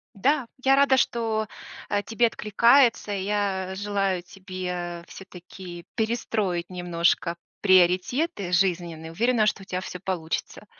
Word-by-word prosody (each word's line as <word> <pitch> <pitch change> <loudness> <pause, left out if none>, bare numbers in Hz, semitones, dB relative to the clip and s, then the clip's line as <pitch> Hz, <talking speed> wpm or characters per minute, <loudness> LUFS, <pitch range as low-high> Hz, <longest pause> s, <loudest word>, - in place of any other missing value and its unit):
Да, 265 +6 +1 0.2
я 270 0 +5
рада, 275 -1 +5
что, 225 -3 0 0.4
э, 205 0 +1
тебе 235 +1 +2
откликается. 230 +2 +3
Я 195 -1 -1
желаю 195 -2 -1
тебе 180 -2 -6
всё-таки 180 -2 -10
перестроить 215 -6 -1
немножко 175 -1 0 0.2
приоритеты 185 - +2
жизненные. 170 -3 0
Уверена, 225 +5 +2
что 210 -2 0
у - - -10
тя 185 -1 -3
всё 185 -1 -7
получится. 175 -4 -4
190 Hz, 115 wpm, -25 LUFS, 180-220 Hz, 0.4 s, я